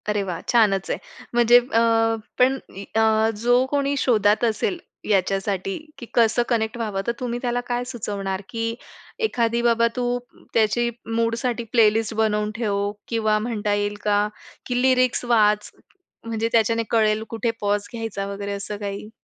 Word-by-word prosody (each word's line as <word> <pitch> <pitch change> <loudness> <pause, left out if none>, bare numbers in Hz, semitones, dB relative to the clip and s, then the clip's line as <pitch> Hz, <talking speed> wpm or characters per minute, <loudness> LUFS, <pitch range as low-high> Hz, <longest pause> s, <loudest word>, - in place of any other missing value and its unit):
अरे 210 -1 +1
वाह! 180 -3 -4
छानच 205 -5 +3
आहे. - - -1 0.4
म्हणजे 240 0 +6
अ, 240 -2 0 0.6
पण 260 +2 +4 0.2
म 195 - -7
अ, 220 0 +3
जो 245 +2 +4
कोणी 285 -1 +1
शोधात 215 -5 +3
असेल 225 - 0 0.3
याच्यासाठी 195 0 0 0.2
की 250 - -8
कसं 235 0 +3
कनेक्ट 225 -1 0
व्हावं, 210 -4 -2
तर - - +3
तुम्ही 240 -1 -3
त्याला 245 -1 0
काय 245 0 -1
सुचवणार? 200 -5 -4
की 230 0 -2 0.5
एखादी 235 - 0
बाबा, 235 -1 +3
तू 245 -1 0 0.3
त्याची 230 +2 +2 0.3
मूडसाठी 230 +1 0
प्लेलिस्ट 225 -1 +3
बनवून 210 -1 +1
ठेव 205 -3 -1 0.2
किंवा 220 -2 +1
म्हणता 215 -2 -1
येईल 205 0 -1
का 205 0 +2 0.4
की 245 -1 -1
लिरिक्स 255 -1 +2
वाच, 210 -3 +3 0.5
म्हणजे 225 0 -1
त्याच्याने 230 0 +2
कळेल 215 -1 +2
कुठे 230 0 -1
पॉज 205 0 0
घ्यायचा 225 -4 -4
वगैरे 200 0 -4
असं 200 +1 -5
काही? 200 0 -5
225 Hz, 150 wpm, -23 LUFS, 205-240 Hz, 0.6 s, म्हणजे